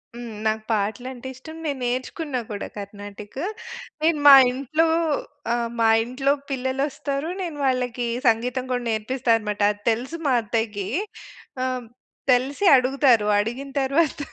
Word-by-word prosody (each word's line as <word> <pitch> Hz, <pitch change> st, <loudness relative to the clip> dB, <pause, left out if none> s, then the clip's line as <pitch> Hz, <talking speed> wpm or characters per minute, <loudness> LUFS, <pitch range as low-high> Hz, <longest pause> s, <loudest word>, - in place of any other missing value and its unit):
హ్మ్. 235 Hz, -2 st, -7 dB
నాకు 220 Hz, 0 st, 0 dB
పాటలంటే 240 Hz, +5 st, -2 dB
ఇష్టం. 315 Hz, +5 st, -11 dB
నే 300 Hz, -, +1 dB
నేర్చుకున్నా 255 Hz, +3 st, -2 dB
కూడా 205 Hz, -, -4 dB
కర్ణాటిక్. 205 Hz, +3 st, -8 dB, 0.6 s
నేను 315 Hz, -1 st, +2 dB
మా 280 Hz, -, +12 dB, 0.2 s
ఇంట్లో 280 Hz, +5 st, 0 dB, 0.6 s
ఆ! -, -, +3 dB, 0.3 s
మా 225 Hz, -, +4 dB, 0.2 s
ఇంట్లో 260 Hz, +4 st, 0 dB, 0.2 s
పిల్లలొస్తారు, 275 Hz, +3 st, -2 dB
నేను 335 Hz, -5 st, -4 dB
వాళ్ళకీ 250 Hz, -2 st, 0 dB, 0.2 s
సంగీతం 250 Hz, +3 st, +1 dB
గోడ 250 Hz, -1 st, 0 dB
నేర్పిస్తా 235 Hz, +3 st, -1 dB
అనమాట. 210 Hz, -1 st, -4 dB
అది 205 Hz, 0 st, -10 dB
తెలుసు 250 Hz, +9 st, -3 dB
మా 270 Hz, -, +3 dB
అత్తయ్యకీ. 220 Hz, -3 st, -2 dB, 0.8 s
ఆహ్, 255 Hz, -1 st, -2 dB, 0.5 s
తెలిసి 270 Hz, +9 st, 0 dB
అడుగుతారు. 255 Hz, -4 st, +3 dB
అడిగిన 240 Hz, +6 st, -3 dB
తర్వాత 290 Hz, +3 st, +1 dB
250 Hz, 125 wpm, -23 LUFS, 225-275 Hz, 0.8 s, మా